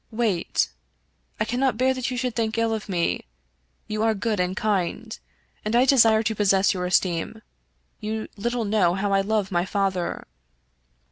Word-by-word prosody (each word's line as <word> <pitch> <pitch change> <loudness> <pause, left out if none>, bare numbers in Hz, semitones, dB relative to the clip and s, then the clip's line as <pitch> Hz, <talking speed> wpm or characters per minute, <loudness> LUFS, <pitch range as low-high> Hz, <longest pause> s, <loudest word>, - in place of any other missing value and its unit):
" - - -42
Wait. 185 -6 0 0.7
I - - +1
cannot 250 -1 0
bear 260 +2 +3
that 255 -1 -3
you 250 - -3
should 250 -2 -2
think 225 -1 -1
ill 230 0 +1
of 215 -1 -5
me. 170 - -1 0.6
You 215 0 -3
are 220 0 +2
good 210 0 -1
and 180 +1 -1
kind, 215 +2 -1 0.5
and 215 +2 -1
I 245 +2 +5
desire 225 -5 +5
to 220 0 0
possess 200 -2 +3
your 180 -1 -2
es 180 - +5
teem. 185 +5 -4 0.6
You 220 0 -4
little 235 +2 -2
know 200 -4 +2
how 200 +1 -1
I 195 - +4
love 205 -1 -1
my 175 -1 +1
father." 190 -2 -2
215 Hz, 180 wpm, -24 LUFS, 190-230 Hz, 0.7 s, I